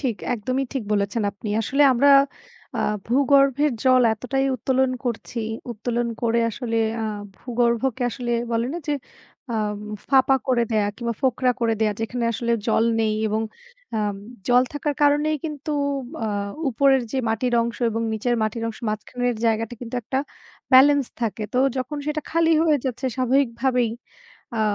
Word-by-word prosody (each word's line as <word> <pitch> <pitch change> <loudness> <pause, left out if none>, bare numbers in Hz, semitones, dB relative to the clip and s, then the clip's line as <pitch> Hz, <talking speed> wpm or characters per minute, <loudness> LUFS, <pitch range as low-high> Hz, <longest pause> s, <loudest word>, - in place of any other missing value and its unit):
ঠিক, 245 -7 -1 0.2
একদমই 255 +4 -2
ঠিক 270 - -2
বলেছেন 205 +2 0
আপনি। 205 +2 -8
আসলে, 275 +6 +2
আমরা 280 +3 +4 0.7
আ - - +1 0.2
ভূগর্ভের 275 +2 +3
জল 255 -1 +5
এতটাই 270 +4 -1
উত্তোলন 260 +2 +1
করছি, 240 0 -4 0.3
উত্তোলন 235 +2 -2
করে 235 0 +2
আসলে 230 0 -3 0.3
আ - - -1 0.3
ভূগর্ভকে 245 +1 0
আসলে 240 0 -4 0.2
বলেনা 245 +9 -1
যে - - +2 0.6
আ - - 0 0.5
ফাঁপা 270 0 +5
করে 245 -2 +3
দেয়া 210 -2 +2
কিংবা 235 -1 -3
ফোকরা 255 -1 +2
করে 230 -1 +2
দেয়া। 215 -1 +2
যেখানে 235 +2 -2
আসলে 235 +1 -1
জল 225 0 +3 0.2
নেই 215 -1 +1
এবং 215 +1 0 0.5
আ - - +1 0.5
জল 245 0 +6
থাকার 290 0 -2
কারণেই 295 +1 +3
কিন্তু 300 -1 -5 0.5
আ - - 0 0.4
উপরের 270 +2 +3
ও - - -12
যে 270 - 0
মাটির 240 +2 0
অংশ 235 0 -4
এবং 225 +1 -2
নিচের 230 +3 0
মাটির 215 +1 -2
অংশের 225 +1 -8
মাঝখানের 245 +3 -2
জায়গাটা 225 +1 0
কিন্তু 245 0 -7
একটা 260 +4 -2 0.5
ব্যালেন্স 280 +1 +7 0.2
থাকে। 225 -1 -2
তো - - +3 0.2
যখন 260 +3 -3
সেটা 300 0 -1
খালি 330 0 +3
হয়ে 310 -2 +4
যাচ্ছে, 260 0 -2
স্বাভাবিকভাবেই 250 -2 +1 0.7
আ - - +1
245 Hz, 155 wpm, -23 LUFS, 230-270 Hz, 0.7 s, ব্যালেন্স